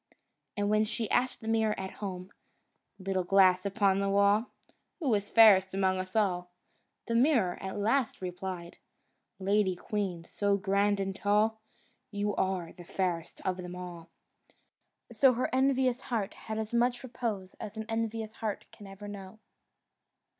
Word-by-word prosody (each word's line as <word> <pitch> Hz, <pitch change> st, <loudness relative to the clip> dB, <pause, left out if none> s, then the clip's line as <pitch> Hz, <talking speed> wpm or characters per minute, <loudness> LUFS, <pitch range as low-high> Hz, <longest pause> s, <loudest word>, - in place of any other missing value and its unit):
And 205 Hz, 0 st, +1 dB
when 215 Hz, 0 st, +4 dB
she 220 Hz, +1 st, -2 dB
asked 255 Hz, +1 st, +1 dB
the 220 Hz, -, -8 dB
mirror 220 Hz, -1 st, +1 dB
at 190 Hz, 0 st, -5 dB
home, 185 Hz, -2 st, -5 dB, 0.7 s
"Little 190 Hz, -1 st, -1 dB
glass 185 Hz, 0 st, +4 dB
upon 195 Hz, -1 st, +2 dB
the 200 Hz, 0 st, 0 dB
wall, 200 Hz, +3 st, +3 dB, 0.5 s
Who 280 Hz, -9 st, +1 dB
is 205 Hz, -1 st, 0 dB
fairest 190 Hz, -4 st, +6 dB
among 190 Hz, -1 st, +1 dB
us 185 Hz, +2 st, -6 dB
all?" 180 Hz, -4 st, +1 dB, 0.6 s
the 230 Hz, -, -2 dB
mirror 235 Hz, -, +3 dB
at 190 Hz, +1 st, -5 dB
last 225 Hz, +4 st, +1 dB
replied, 180 Hz, -1 st, -6 dB, 0.6 s
"Lady 195 Hz, -1 st, +1 dB
queen, 185 Hz, -3 st, -3 dB
so 200 Hz, +3 st, 0 dB
grand 200 Hz, +1 st, +1 dB
and 195 Hz, -1 st, -2 dB
tall, 215 Hz, +2 st, +1 dB, 0.5 s
You 205 Hz, 0 st, -1 dB
are 185 Hz, -3 st, -1 dB
the 175 Hz, -, -12 dB
fairest 175 Hz, -2 st, -3 dB
of 185 Hz, -1 st, 0 dB
them 180 Hz, -1 st, -7 dB
all." 175 Hz, -2 st, -8 dB, 1.0 s
So 265 Hz, -2 st, +5 dB
her 250 Hz, +2 st, -2 dB
envious 260 Hz, -1 st, +2 dB
heart 220 Hz, -6 st, -2 dB
had 220 Hz, 0 st, -6 dB
as 220 Hz, +1 st, -4 dB
much 245 Hz, +1 st, +1 dB
repose 225 Hz, -7 st, -4 dB
as 210 Hz, +1 st, -7 dB
an 220 Hz, -, -4 dB
envious 225 Hz, -1 st, -2 dB
heart 215 Hz, -2 st, -3 dB
can 205 Hz, -, -12 dB
ever 195 Hz, +1 st, -10 dB
know. 200 Hz, 0 st, -9 dB
200 Hz, 155 wpm, -30 LUFS, 190-220 Hz, 1.0 s, fairest